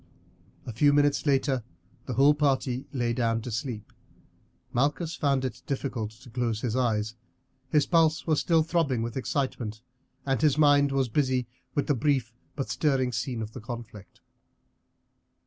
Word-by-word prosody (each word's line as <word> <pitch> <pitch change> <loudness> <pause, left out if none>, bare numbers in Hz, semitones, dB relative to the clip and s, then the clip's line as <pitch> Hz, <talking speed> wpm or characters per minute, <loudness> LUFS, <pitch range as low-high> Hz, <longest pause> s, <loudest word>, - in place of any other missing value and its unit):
A 120 - -6
few 145 +6 +4
minutes 145 +1 +2
later 135 -3 +2 0.4
the 130 - -2
whole 140 +4 +6
party 135 -3 0
lay 120 -4 0
down 115 -1 +1
to 125 - -5
sleep. 110 -2 -5 0.8
Malchus 150 +6 0
found 140 -2 +1
it 125 -1 -5
difficult 130 -5 -2
to 120 +4 -16
close 115 -3 -1
his 120 -2 -1
eyes. 110 -4 0 0.6
His 150 0 +3
pulse 160 -2 +3
was 155 -3 +2
still 165 -2 +3
throbbing 155 -8 0
with 115 0 -4
excitement, 125 -5 -2 0.4
and 135 -1 0
his 150 -2 +3
mind 145 -2 +5
was 135 -2 +1
busy 130 0 +1 0.3
with 145 - +1
the 145 - +2
brief 130 -3 0 0.2
but 135 - -3
stirring 135 -4 +1
scene 120 0 -3
of 110 - -7
the 130 - -8
conflict. 110 -3 -9
130 Hz, 155 wpm, -27 LUFS, 120-145 Hz, 0.8 s, whole